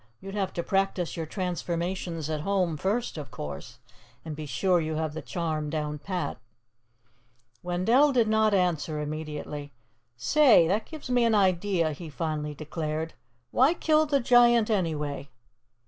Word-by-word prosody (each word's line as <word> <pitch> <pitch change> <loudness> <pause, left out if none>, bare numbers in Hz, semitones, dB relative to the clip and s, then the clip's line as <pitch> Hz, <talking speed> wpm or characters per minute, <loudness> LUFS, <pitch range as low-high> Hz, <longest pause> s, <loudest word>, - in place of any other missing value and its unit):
"You'd 195 0 -8
have 200 -2 -1
to 170 - -2
practice 195 -2 0
your 165 -2 -4
transformations 175 -2 -3
at 155 -1 -2
home, 185 -2 0
first, 195 +3 -1
of 140 -3 -7
course, 75 -8 -7 0.5
and 155 -2 -5
be 155 0 -6
sure 175 +8 +2
you 155 0 -2
have 155 -1 -2
the 160 - -5
charm 155 -3 -3
down 150 -1 -3
pat." 185 +2 -3 1.2
Wendell 225 +12 +3
did 240 -4 +3
not 220 0 +3
answer 170 -5 +1
immediately. 150 -1 -5 0.4
"Say, 240 - +5
that 205 +5 0
gives 310 -5 -8
me 245 -1 +3
an 230 -2 +3
idea," 185 -3 +2
he 160 +2 -8
finally 150 -1 -3
declared. 155 +1 -4 0.4
"Why 275 +7 +4
kill 310 -2 +3
the 285 -1 +2
Giant, 240 -2 +5
anyway?" 150 -7 -1
170 Hz, 145 wpm, -27 LUFS, 155-205 Hz, 1.2 s, Say